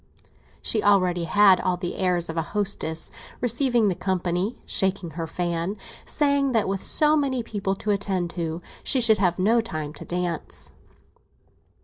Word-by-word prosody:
She 215 - +1
already 185 -4 +2
had 195 +1 +5
all 180 -1 0
the 175 -1 -4
airs 180 -2 0
of 160 - -5
a 165 - +1 0.2
hostess, 180 -6 -1 0.3
receiving 245 -1 +2
the 195 - +2
company, 185 +3 -2
shaking 190 -3 -1
her 165 +1 -5
fan, 175 +3 -2 0.3
saying 280 -2 +1
that 225 -2 +2
with 195 0 -2
so 300 0 +5
many 270 -5 0
people 195 -3 -3
to 210 +2 -2
attend 190 -4 -1
to 165 0 -4 0.2
she 265 - +2
should 220 -3 +4
have 180 -3 +2
no 220 +5 +3
time 155 -9 -5
to - - -9
dance. 175 -2 -5
190 Hz, 155 wpm, -24 LUFS, 175-220 Hz, 0.3 s, had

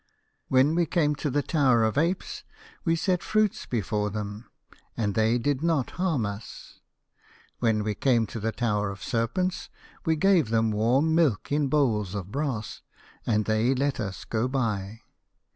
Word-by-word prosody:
When 135 +4 +4
we 170 0 +1
came 150 -2 +2
to 150 - -2
the 145 +2 0
Tower 130 -7 +3
of 110 -1 +1
Apes 170 +6 -1 0.4
we 165 -1 +2
set 180 +1 0
fruits 215 -2 0
before 105 -2 -1
them, 105 +1 -6 0.5
and 105 -3 0
they 110 +3 +2
did 135 +3 -1
not 160 -6 0
harm 165 - 0
us. 100 +2 -8 0.8
When 110 -3 +1
we 105 0 -1
came 120 +1 +2
to 115 - -7
the 110 +2 -1
Tower 105 -3 -1
of 100 -1 -8
Serpents 180 +12 -1 0.3
we 160 -4 +2
gave 175 - +3
them 115 -1 +2
warm 125 +9 +2
milk 155 - +1
in 145 0 +2
bowls 110 -9 +1
of 100 -1 -5
brass, 135 -7 -3 0.5
and 110 -2 +2
they 110 +4 +2
let 140 +1 0
us 95 -3 -5
go 115 +2 -1
by. 115 -5 -2
120 Hz, 160 wpm, -26 LUFS, 110-150 Hz, 0.8 s, When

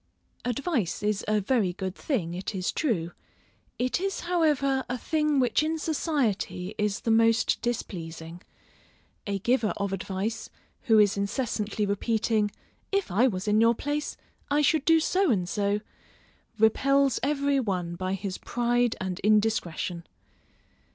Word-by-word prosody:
_ - - 0
Advice 245 - -1
is 210 -1 0
a 215 0 +2
very 205 -3 +1
good 190 0 -4
thing, 190 - -2
it 185 +3 -4
is 185 -1 -1
true; 175 - -1 0.7
it 250 +6 0
is 390 0 -2
however 295 -6 +1
a 250 - -1
thing 300 +2 +1
which 250 +1 +2
in 315 +1 0
society 275 - -1
is 210 -1 0
the 230 - 0
most 225 0 +3
displeasing. 170 -7 -5 0.9
A 200 0 -1
giver 225 +2 +1
of 200 -1 -2
advice, 195 +4 -3 0.4
who 225 -4 +5
is 205 -1 +4
incessantly 210 0 -1
repeating, 215 +1 +1 0.4
If 395 - 0
I 230 +8 +4
was 190 -3 -3
in 210 +1 +4
your 230 +1 +5
place, 290 +4 -3 0.3
I 290 +1 +2
should 300 -1 +2
do 325 0 +6
so 370 +3 +2
and 185 -7 +1
so, 205 +1 0 0.8
repels 275 +4 +3
every 280 0 +1
one 185 -7 -2
by 185 +2 -2
his 195 -1 -5
pride 240 -1 +1
and 185 -1 -3
indiscretion. 205 -5 0
220 Hz, 145 wpm, -27 LUFS, 195-275 Hz, 0.9 s, do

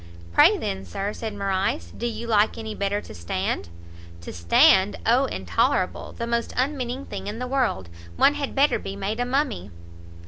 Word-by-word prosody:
"Pray - - +6
then, 95 0 -3
Sir," 195 - -4
said 220 -2 -5
Morrice, 190 - -1
"do 240 - -3
you 235 0 -5
like 215 -2 +2
any 220 -1 -5
better 200 0 -1
to - - -11
stand?" 85 -1 -3 0.5
"To 85 - -8
stand? 190 - +4
O 250 +4 +4
intolerable! - - -1
the 235 - -4
most 235 0 -1
unmeaning 260 -1 -1
thing - - -7
in 210 +2 -4
the 250 - -3
world! 250 - 0 0.3
one 285 - +5
had 290 -2 -4
better 280 +2 +3
be 195 - -6
made 200 +3 -3
a 245 - +1
mummy!" 260 - -1
215 Hz, 175 wpm, -24 LUFS, 190-250 Hz, 0.5 s, Pray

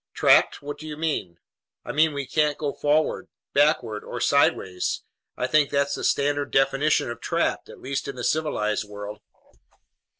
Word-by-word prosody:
"Trapped! - - +4
What 145 0 -6
do 155 - -8
you 150 -1 -6
mean?" 150 - -2 0.5
"I - - -4
mean 155 0 +2
we 140 -1 -3
can't 150 +2 +1
go 145 -2 -2
forward, 150 +2 +1 0.3
backward, 135 -8 +2
or - - -6
sideways. 90 -1 +1 0.3
I - - -1
think 150 -2 +3
that's 140 0 +1
the - - -4
standard 145 0 +1
definition 135 -1 +2
of 120 - -8
'trapped,' - - -1
at - - -12
least 135 +2 -3
in 140 - -5
the 125 - -6
civilized 110 -10 0
world." 105 +1 -8
140 Hz, 165 wpm, -25 LUFS, 120-150 Hz, 0.5 s, Trapped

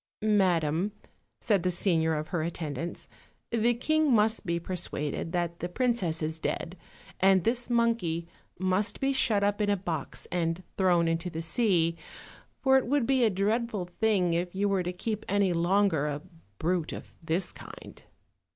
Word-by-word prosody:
"Madam," 185 -3 +2 0.5
said 205 -6 +2
the 185 - +1
senior 165 -3 +1
of 155 +1 -4
her 175 - -1
attendants, 160 -1 -4 0.4
"the 235 +1 +2
king 310 +4 +2
must 220 -2 +3
be 170 0 0
persuaded 165 -3 -4
that 175 -1 -2
the 175 - -3
princess 185 -7 0
is 160 +1 -2
dead, 175 +2 -3 0.4
and 190 -1 +5
this 240 +3 0
monkey 230 -9 +1 0.3
must 185 +3 0
be 270 0 +1
shut 220 -6 +2
up 205 +1 +1
in 205 - +1
a 200 - +2
box 165 -6 -5
and 170 0 -1
thrown 175 -3 +3
into 165 +2 -1
the 165 -1 -5
sea, 170 -4 +2 0.7
for 265 -1 +6
it 260 - -6
would 280 -1 +2
be 265 0 +3
a 225 - +5
dreadful 210 +1 0
thing 180 -1 +1
if 175 +2 -2
you 200 +1 +1
were 195 -2 +1
to 180 0 -2
keep 210 +4 -4
any 200 -2 +2
longer 170 -3 +2
a 145 0 -4 0.3
brute 170 -1 -1
of - - -9
this 165 +3 0
kind." - - -12
185 Hz, 165 wpm, -28 LUFS, 170-215 Hz, 0.7 s, for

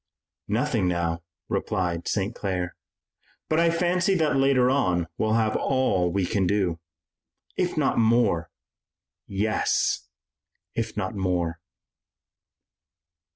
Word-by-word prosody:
"Nothing 115 -2 +1
now," 85 -1 -1 0.3
replied 85 -2 -1
St. 100 +2 -1
Clair, 90 -5 -3 0.7
"but 155 - +2
I 170 0 +4
fancy 180 +3 +2
that 155 -4 +2
later 135 -2 +4
on 90 -11 +2
we'll 110 0 +1
have 110 -1 +2
all 110 -10 +1
we 95 0 0
can 95 0 +1
do." 95 -4 0 0.8
"If - - -1
not - - +2
more." 110 -8 +3 0.8
"Yes, 105 +2 0 0.7
if 115 -2 -3
not 95 -1 -2
more." 90 -4 -1
105 Hz, 110 wpm, -25 LUFS, 90-130 Hz, 0.8 s, I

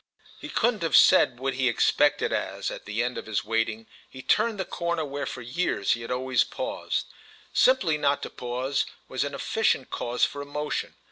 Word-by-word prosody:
He - - -8
couldn't 230 -3 +1
have 165 - +1
said 120 -2 +6
what 135 0 -1
he 130 -1 +1
expected 145 +4 +2
as, - - -2
at - - -8
the 105 +3 -1
end 125 +1 -2
of - - -10
his 110 -2 -1
waiting, 115 0 -1 0.2
he 130 0 -10
turned 225 -3 +2
the 190 - -1
corner 170 -2 -2
where 140 -1 -4
for 125 -2 -6
years 120 - -1
he 115 - +1
had 115 - -7
always 130 0 +1
paused; - - -3 0.5
simply 185 -13 +3
not 145 -1 +1
to - - -5
pause 125 +3 -2 0.2
was 130 - -1
a 145 - -3
efficient 140 -1 0
cause 120 +1 +1
for 145 - -6
emotion. 150 +1 -4
135 Hz, 190 wpm, -26 LUFS, 120-150 Hz, 0.5 s, said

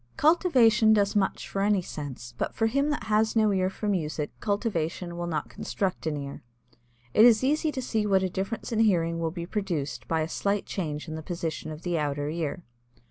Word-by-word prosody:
Cultivation 250 - +5
does 205 -1 +2
much 195 -2 0
for 195 - -2
any 200 -2 +2
sense, 135 -7 -7
but - - -2
for 225 - +1
him 275 +6 +1
that 295 - -1
has 220 +1 +2
no 215 -2 +4
ear 185 -1 +1
for 210 +2 -5
music 155 -6 -1
cultivation 180 -5 -2
will 175 0 -3
not 155 -3 -2
construct 185 -4 -3
an 150 -2 -1
ear. 140 -1 -6 0.7
It 215 - +6
is 235 0 +6
easy 305 +3 +2
to 260 -3 -4
see 220 -3 0
what 190 -2 +3
a - - +2
difference 195 +7 -4
in 225 - 0
hearing 170 -6 +2
will 165 -1 0
be 170 +1 -5
produced 175 -8 -3
by 160 -1 +1
a 155 - -1
slight 200 +4 -1
change 155 -5 -4
in 155 - -5
the 160 - -5
position 160 -2 -4
of 155 +1 -9
the 175 -2 0
outer 145 0 -1
ear. 165 +2 -3
190 Hz, 205 wpm, -27 LUFS, 160-220 Hz, 0.7 s, It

